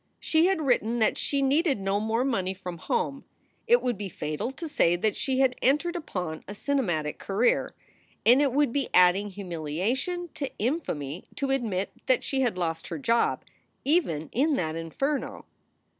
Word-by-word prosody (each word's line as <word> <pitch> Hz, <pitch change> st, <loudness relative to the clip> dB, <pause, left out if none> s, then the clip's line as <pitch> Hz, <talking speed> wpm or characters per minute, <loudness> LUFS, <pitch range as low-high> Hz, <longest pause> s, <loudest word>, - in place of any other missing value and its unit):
She 320 Hz, +2 st, +3 dB
had 380 Hz, -5 st, +1 dB
written 240 Hz, -3 st, +1 dB
that 220 Hz, -, +3 dB
she 280 Hz, -1 st, 0 dB
needed 280 Hz, -, +2 dB
no 195 Hz, +1 st, 0 dB
more 220 Hz, +3 st, 0 dB
money 190 Hz, -8 st, 0 dB
from 180 Hz, -2 st, -7 dB
home. 275 Hz, +10 st, -2 dB, 0.4 s
It 480 Hz, +1 st, +5 dB
would 245 Hz, -5 st, -1 dB
be 200 Hz, -2 st, -4 dB
fatal 155 Hz, -, -3 dB
to 320 Hz, +5 st, -6 dB
say 175 Hz, -, +3 dB
that 205 Hz, +4 st, 0 dB
she 265 Hz, -1 st, 0 dB
had 260 Hz, -2 st, +3 dB
entered 300 Hz, +7 st, +2 dB
upon 180 Hz, -, -4 dB
a 205 Hz, -, -6 dB
cinematic 180 Hz, -, -1 dB
career. 205 Hz, +5 st, +1 dB, 0.5 s
And 245 Hz, +5 st, +7 dB
it 280 Hz, -2 st, +2 dB
would 280 Hz, -2 st, +2 dB
be 280 Hz, -2 st, -1 dB
adding 180 Hz, +3 st, +5 dB
humilia 180 Hz, -, -2 dB
tion 350 Hz, +5 st, -3 dB
to 280 Hz, -2 st, -3 dB
infamy 185 Hz, -, -2 dB
to 275 Hz, -2 st, -1 dB
admit 215 Hz, -8 st, -1 dB, 0.2 s
that 255 Hz, -2 st, +3 dB
she 270 Hz, -1 st, 0 dB
had 240 Hz, -7 st, 0 dB
lost 165 Hz, -2 st, -2 dB
her -, -, -4 dB
job 235 Hz, -4 st, +1 dB, 0.4 s
even 215 Hz, -, +1 dB
in 290 Hz, +4 st, +2 dB
that 160 Hz, -8 st, -1 dB
inferno. 270 Hz, -, -3 dB
235 Hz, 175 wpm, -27 LUFS, 180-280 Hz, 0.5 s, And